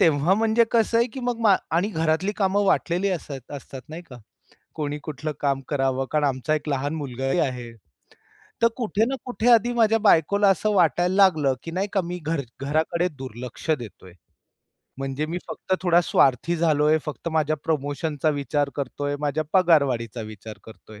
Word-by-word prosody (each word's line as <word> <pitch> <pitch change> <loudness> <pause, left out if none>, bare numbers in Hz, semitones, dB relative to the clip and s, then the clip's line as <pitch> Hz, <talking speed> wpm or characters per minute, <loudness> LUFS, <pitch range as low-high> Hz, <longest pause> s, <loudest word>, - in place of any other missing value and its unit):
तेव्हा 160 +3 +4
म्हणजे 225 +2 +3
कसं 230 0 +3
आहे, 235 - +3
की 255 +2 -8
मग 240 -2 -1 0.3
आणि 175 +5 +2
घरातली 165 +1 0
कामं 200 +1 +2
वाटलेली 185 0 +1
असंय 155 -6 -4 0.2
असतात 135 -1 -9
नाही 160 +3 -8
का. 135 -7 -13 0.6
कोणी 150 -1 -3
कुठलं 155 0 -4
काम 140 -2 0
करावं 135 -2 0
कारण 150 -1 +1
आमचा 135 +3 -1
एक 150 0 -4
लहान 140 +1 -1
मुलगाही 135 +1 -2
आहे. 125 -5 -2 0.9
तर 230 - +6
कुठे 220 -3 0
ना 265 +3 -2
कुठे 245 -1 0
आधी 235 +1 +4
माझ्या 225 -2 +3
बायकोला 200 0 +4
असं 195 +3 +1
वाटायला 180 0 +2
लागलं, 160 -9 +4
की 165 - -6
नाही 190 +4 -1
का 195 - +2
मी 180 0 -5
घर 160 -2 0 0.2
घराकडे 160 +5 0
दुर्लक्ष 125 +3 -8
देतोय. 100 -5 -11 0.9
म्हणजे 135 +2 -3
मी 170 +3 -3
फक्त 190 - -2
थोडा 175 -1 +4
स्वार्थी 140 +6 +3
झालोय. 155 -1 +3
फक्त 150 +2 -5
माझ्या 155 0 +1
प्रमोशनचा 150 0 -1
विचार 145 0 0
करतोय. 145 +1 -3
माझ्या 150 +1 -1
पगारवाढीचा 140 - +2
विचार 110 +1 -10
करतोय. 110 -1 -14
155 Hz, 165 wpm, -24 LUFS, 140-190 Hz, 0.9 s, तर